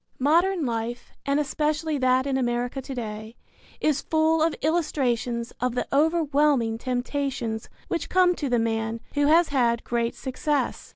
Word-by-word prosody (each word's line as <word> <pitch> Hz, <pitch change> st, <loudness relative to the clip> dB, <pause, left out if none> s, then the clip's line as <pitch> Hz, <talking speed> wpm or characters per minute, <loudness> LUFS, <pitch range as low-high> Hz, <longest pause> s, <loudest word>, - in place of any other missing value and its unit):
Modern 335 Hz, +5 st, +2 dB
life, 235 Hz, 0 st, -3 dB, 0.2 s
and 280 Hz, +1 st, +2 dB
especially 300 Hz, +1 st, -1 dB
that 255 Hz, 0 st, +3 dB
in 275 Hz, -1 st, 0 dB
America 245 Hz, +1 st, -1 dB
to 265 Hz, +1 st, -7 dB
day, 220 Hz, -1 st, -6 dB, 0.4 s
is 300 Hz, -2 st, +1 dB
full 320 Hz, 0 st, +2 dB
of 325 Hz, 0 st, +2 dB
illustrations 250 Hz, -7 st, 0 dB
of 250 Hz, -1 st, 0 dB
the -, -, 0 dB
overwhelming 290 Hz, -6 st, +2 dB
temptations 250 Hz, -2 st, -3 dB, 0.2 s
which 335 Hz, -, -3 dB
come 365 Hz, -1 st, +4 dB
to 285 Hz, -, -2 dB
the 245 Hz, -, +2 dB
man 225 Hz, 0 st, -1 dB
who 290 Hz, 0 st, +2 dB
has 330 Hz, +2 st, +5 dB
had 240 Hz, -4 st, +1 dB
great 235 Hz, -1 st, -1 dB
success. 290 Hz, +3 st, -2 dB
265 Hz, 150 wpm, -25 LUFS, 240-300 Hz, 0.4 s, has